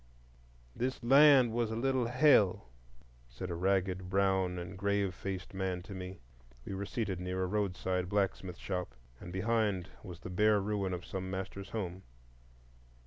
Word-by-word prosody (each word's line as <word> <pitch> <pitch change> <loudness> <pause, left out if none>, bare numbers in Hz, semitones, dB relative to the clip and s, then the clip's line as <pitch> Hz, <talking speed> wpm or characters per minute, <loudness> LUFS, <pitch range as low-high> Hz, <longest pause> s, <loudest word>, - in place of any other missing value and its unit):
"This 130 +1 -2
land 135 -1 +7
was 115 -1 0
a 110 - -3
little 130 0 +1
Hell," 120 - +4 0.6
said 95 -1 -6
a - - -2
ragged, 95 0 0
brown, 95 -1 +2
and 90 +2 -6
grave 100 -1 0
faced 95 +1 -5
man 95 -2 -2
to 100 +1 -9
me. 95 0 -6 0.5
We - - -5
were 100 +1 -4
seated 105 -6 -2
near 90 +1 -2
a - - +1
roadside 90 -2 -1
blacksmith 95 -3 -1
shop, 90 -10 -4 0.2
and 85 - -9
behind 100 -1 0
was 90 -4 -10
the - - -7
bare 105 +3 +4
ruin 100 -1 -1
of 90 -1 -4
some 95 -1 -5
master's 95 +1 -5
home. 95 -4 -4
95 Hz, 155 wpm, -33 LUFS, 90-105 Hz, 0.6 s, land